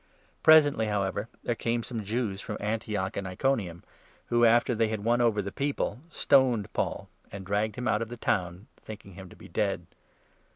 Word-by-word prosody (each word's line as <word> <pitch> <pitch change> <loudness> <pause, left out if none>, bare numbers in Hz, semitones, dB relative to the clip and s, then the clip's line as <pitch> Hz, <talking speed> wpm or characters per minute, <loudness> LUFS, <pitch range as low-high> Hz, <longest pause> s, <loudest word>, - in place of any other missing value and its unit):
Presently, 145 -8 +6
however, 100 -3 -1
there - - 0
came 115 0 -1
some 115 -3 -5
Jews 105 -2 -2
from - - -5
Antioch 105 -2 -2
19 - - -1
and 100 - -5
Iconium 95 -4 -1 0.5
who, 120 0 +4
after 120 +2 +4
they 115 -1 +2
had 110 -1 -3
won 120 +2 +2
over 110 -4 +2
the 100 - -5
people, 140 -1 -2
stoned 125 - +2
Paul, - - -2 0.2
and 100 -1 -8
dragged 105 +2 -1
him 125 +1 -3
out - - +2
of 115 - -3
the 120 - -7
town, 90 -2 -1
thinking 105 -2 -11
him 95 0 -10
to - - -14
be - - -13
dead. - - -1
110 Hz, 190 wpm, -28 LUFS, 100-120 Hz, 0.5 s, Presently